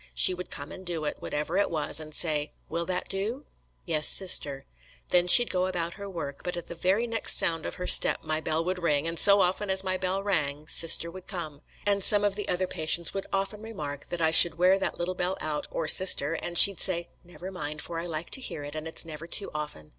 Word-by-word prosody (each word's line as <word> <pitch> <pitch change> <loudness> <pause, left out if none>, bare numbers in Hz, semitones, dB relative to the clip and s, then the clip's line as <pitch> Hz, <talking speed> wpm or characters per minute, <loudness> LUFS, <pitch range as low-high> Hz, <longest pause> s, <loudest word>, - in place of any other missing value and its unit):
She 185 - +5
would 180 0 -9
come 140 - -9
and 190 - -11
do 170 -4 -4
it, 150 - -4
whatever 150 +5 -5
it 200 - 0
was, 160 -2 0
and 155 -1 -10
say, 150 -1 -1 0.2
'Will 170 0 -5
that 185 -1 -3
do?' 220 +9 -3 0.4
'Yes, 155 -3 +1
Sister.' 145 -7 +2 0.4
Then 180 0 +2
she'd 240 +6 +7
go 185 0 -1
about 170 -2 -5
her 200 0 -10
work, 145 -6 -8
but 180 -1 -5
at 175 - -7
the - - -9
very 190 +7 -1
next 230 -1 +3
sound 165 -3 +1
of - - -8
her 180 - -7
step - - +4
my 155 0 -2
bell 160 +1 -3
would 180 0 -4
ring, 150 -2 -1
and 165 0 -4
so 200 0 +6
often 190 +2 -2
as 190 0 0
my 185 -1 -2
bell 190 +1 -3
rang 150 -6 -3
Sister 170 +1 +3
would 185 +1 -13
come; 155 -6 -7 0.2
and 200 -1 +2
some 205 +1 +4
of 205 -1 0
the 205 0 -5
other 180 +1 -1
patients 160 0 0
would 195 - -6
often 195 +2 -4
remark 150 -11 -8
that 175 -1 -5
I 160 -1 +1
should 165 0 +6
wear 185 +2 +2
that - - -4
little 175 +2 -4
bell 180 +1 -3
out 150 -1 -4
or 160 - -5
Sister, 165 -3 +5
and 175 +1 -4
she'd 200 0 +9
say, 175 -2 +2
'Never 175 +1 -11
mind, 150 -4 -5
for 165 -1 -6
I 170 - -6
like 160 0 -6
to 265 - +1
hear 155 - -5
it, 145 0 -9
and 155 +1 -7
it's 160 - -5
never 160 0 -10
too 200 +3 -1
often.' 150 - -7
175 Hz, 240 wpm, -26 LUFS, 155-190 Hz, 0.4 s, she'd